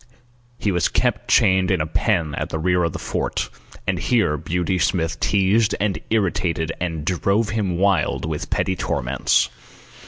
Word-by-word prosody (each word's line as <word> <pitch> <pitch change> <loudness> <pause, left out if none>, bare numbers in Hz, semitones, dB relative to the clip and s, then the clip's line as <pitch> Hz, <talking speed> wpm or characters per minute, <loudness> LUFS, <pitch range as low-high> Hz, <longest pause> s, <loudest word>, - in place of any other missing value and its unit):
He 105 - 0
was 90 -1 +2
kept - - 0
chained 95 -1 +4
in 95 - +2
a 75 - 0
pen 85 -1 0
at 75 +1 -3
the - - -3
rear 90 +2 +1
of 85 - 0
the - - -5
fort, - - -3 0.3
and - - 0
here 110 -11 +2
Beauty 90 +4 -1
Smith 85 -2 0
teased 105 +2 +2
and 100 -1 0
irritated 90 -6 0
and 80 -4 -3
drove 100 +5 +1
him 100 -6 -1
wild 95 -4 +1
with 80 -2 -4
petty 95 - 0
torments. 60 -6 +1
90 Hz, 160 wpm, -22 LUFS, 80-100 Hz, 0.3 s, chained